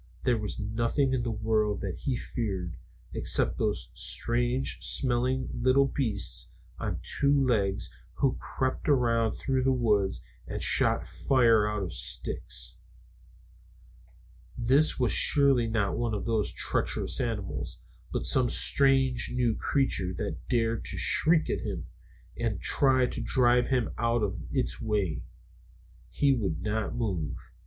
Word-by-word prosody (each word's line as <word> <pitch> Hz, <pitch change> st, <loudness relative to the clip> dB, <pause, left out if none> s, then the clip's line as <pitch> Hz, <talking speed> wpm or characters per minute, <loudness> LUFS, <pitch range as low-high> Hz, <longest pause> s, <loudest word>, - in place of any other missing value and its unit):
There 120 Hz, -3 st, +2 dB
was 105 Hz, -1 st, -4 dB
nothing 115 Hz, +6 st, 0 dB
in 130 Hz, -, 0 dB
the 120 Hz, -, -2 dB
world 110 Hz, -1 st, 0 dB
that 95 Hz, -4 st, -4 dB
he 135 Hz, -3 st, -1 dB
feared, 95 Hz, -8 st, -4 dB, 0.4 s
except -, -, 0 dB
those -, -, -2 dB
strange 120 Hz, +2 st, 0 dB
smelling 130 Hz, +1 st, 0 dB
little 130 Hz, +3 st, +3 dB
beasts 115 Hz, -8 st, -2 dB, 0.3 s
on -, -, -3 dB
two 140 Hz, -1 st, +1 dB
legs 120 Hz, -9 st, +1 dB, 0.2 s
who 135 Hz, -2 st, +1 dB
crept 130 Hz, +3 st, -3 dB
around 115 Hz, -5 st, +2 dB
through 130 Hz, -2 st, -1 dB
the 135 Hz, +1 st, +2 dB
woods 105 Hz, -6 st, +1 dB, 0.2 s
and -, -, -4 dB
shot -, -, +3 dB
fire 115 Hz, -5 st, +3 dB
out 105 Hz, -2 st, -2 dB
of 85 Hz, -4 st, -5 dB
sticks. -, -, -4 dB, 1.8 s
This 135 Hz, +7 st, +3 dB
was 125 Hz, -3 st, +2 dB
surely 140 Hz, -5 st, +4 dB
not 110 Hz, -3 st, 0 dB
one 120 Hz, -2 st, -1 dB
of 100 Hz, -, -4 dB
those 110 Hz, -3 st, +1 dB
treacherous -, -, -1 dB
animals, -, -, -4 dB, 0.3 s
but -, -, -2 dB
some 125 Hz, -2 st, +2 dB
strange 135 Hz, -2 st, +3 dB
new 125 Hz, -2 st, +1 dB
creature 105 Hz, -9 st, 0 dB
that -, -, -5 dB
dared 115 Hz, -2 st, 0 dB
to -, -, -3 dB
shriek 160 Hz, 0 st, +3 dB
at -, -, -2 dB
him -, -, -5 dB, 0.5 s
and 115 Hz, -5 st, -2 dB
try 130 Hz, -2 st, +3 dB
to -, -, -4 dB
drive 125 Hz, -1 st, +3 dB
him 125 Hz, -3 st, 0 dB
out 115 Hz, -1 st, +1 dB
of 100 Hz, -2 st, -2 dB
its 130 Hz, -3 st, -2 dB
way. 105 Hz, -7 st, -1 dB, 0.9 s
He 140 Hz, -, +2 dB
would 95 Hz, -9 st, -2 dB
not 110 Hz, 0 st, -2 dB
move. 95 Hz, -11 st, -2 dB
120 Hz, 135 wpm, -28 LUFS, 105-130 Hz, 1.8 s, surely